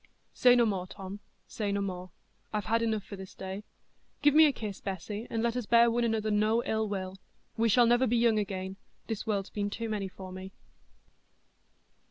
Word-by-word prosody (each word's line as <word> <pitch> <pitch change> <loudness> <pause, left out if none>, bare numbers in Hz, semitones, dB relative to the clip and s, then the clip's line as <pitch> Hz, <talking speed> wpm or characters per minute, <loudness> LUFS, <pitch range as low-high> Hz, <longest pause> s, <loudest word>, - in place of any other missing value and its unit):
"Say 245 -1 +6
no 240 -1 +5
more, 190 -4 -1
Tom, 195 +1 -8 0.3
say 210 -2 -3
no 200 - 0
more; 185 -2 -4 0.4
I've 210 -2 -2
had 230 +3 +2
enough 220 -3 0
for 200 - -8
this 190 -1 -10
day. 190 +2 -6 0.6
Give 290 -1 +6
me 315 +1 +8
a - - +3
kiss, 210 -6 -6
Bessy, 205 +3 -5
and 225 0 -1
let 235 0 +1
us 245 -4 -3
bear 235 0 +6
one 240 +1 +1
another 220 -2 0
no 215 +3 +2
ill 220 -1 -1
will; 190 -1 -4 0.4
we 230 0 +2
shall 240 +3 +6
never 240 +2 +4
be 240 - +2
young 230 -2 +4
again—this 195 +3 -6
world's 200 -2 -1
been 205 -1 -2
too 230 +2 -4
many 205 -3 -2
for 185 0 -10
me." 190 +1 -8
210 Hz, 195 wpm, -30 LUFS, 195-230 Hz, 0.6 s, me